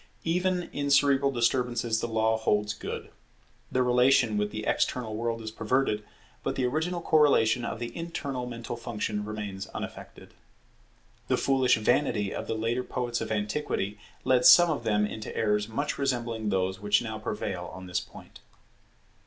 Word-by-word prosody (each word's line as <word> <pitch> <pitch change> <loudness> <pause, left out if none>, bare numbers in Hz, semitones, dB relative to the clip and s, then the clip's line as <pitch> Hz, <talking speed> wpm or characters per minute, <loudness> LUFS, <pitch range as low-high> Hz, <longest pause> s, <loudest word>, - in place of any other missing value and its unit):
Even 180 +2 +1
in 145 0 -2
cerebral 140 0 +4
disturbances 120 -2 +1
the 120 - -2
law 110 0 +2
holds 105 -1 +1
good. - - -6 0.6
The 130 - +2
relation 125 -2 +4
with 105 0 0
the 110 0 -5
external 115 -4 0
world 115 0 -2
is 110 - -5
perverted, 115 -1 0 0.4
but - - -2
the 130 - 0
original 160 +7 -1
correlation 130 -7 +4
of 115 - -3
the 120 0 -6
internal 140 -7 -4
mental 120 -1 -5
functions 110 -3 -3
remains 105 -3 -5
unaffected. - - -8 0.9
The - - +2
foolish 130 -3 +3
vanity 110 -3 +1
of - - -5
the - - -1
later 115 +3 -1
poets 120 -2 -3
of 110 - -4
antiquity 105 -1 -2 0.2
led 125 -1 +3
some 170 +7 +8
of 140 -6 -3
them 105 -1 +2
into 110 +1 -6
errors 105 0 +1
much 145 +7 -2
resembling 120 -5 -1
those 95 -1 0
which 105 +2 +2
now 110 -2 -5
prevail 95 -4 -4
on 95 - -9
this 90 -1 -1
point. - - -13
115 Hz, 160 wpm, -28 LUFS, 105-130 Hz, 0.9 s, some